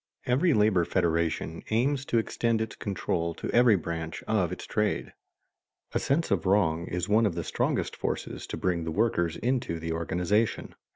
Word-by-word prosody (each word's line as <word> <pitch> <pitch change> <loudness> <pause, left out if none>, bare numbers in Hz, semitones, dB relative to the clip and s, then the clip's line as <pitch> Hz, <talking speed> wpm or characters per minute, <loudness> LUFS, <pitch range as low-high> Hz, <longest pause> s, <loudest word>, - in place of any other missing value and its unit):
_ - - -65 0.2
Every 145 +6 +3
labor 105 -4 +4
federation 85 -2 0
aims 130 +5 +1
to 120 - +1
extend 115 0 0
its 110 -1 -3
control 85 -4 -2
to - - -4
every 120 -3 +6
branch 80 -1 -4
of 95 -6 +1
its 90 - -6
trade. 105 0 -1 0.8
A - - +2
sense 140 -1 0
of 100 -1 +1
wrong 85 -4 +2
is 90 +1 -2
one 110 +1 +4
of 85 - -3
the 85 - -2
strongest - - -1
forces - - -4
to - - -5
bring 90 -2 0
the 80 - -3
workers 85 -3 +1
into 125 -8 -1
the 80 0 -4
organization. 90 +6 0
100 Hz, 175 wpm, -28 LUFS, 85-115 Hz, 0.8 s, every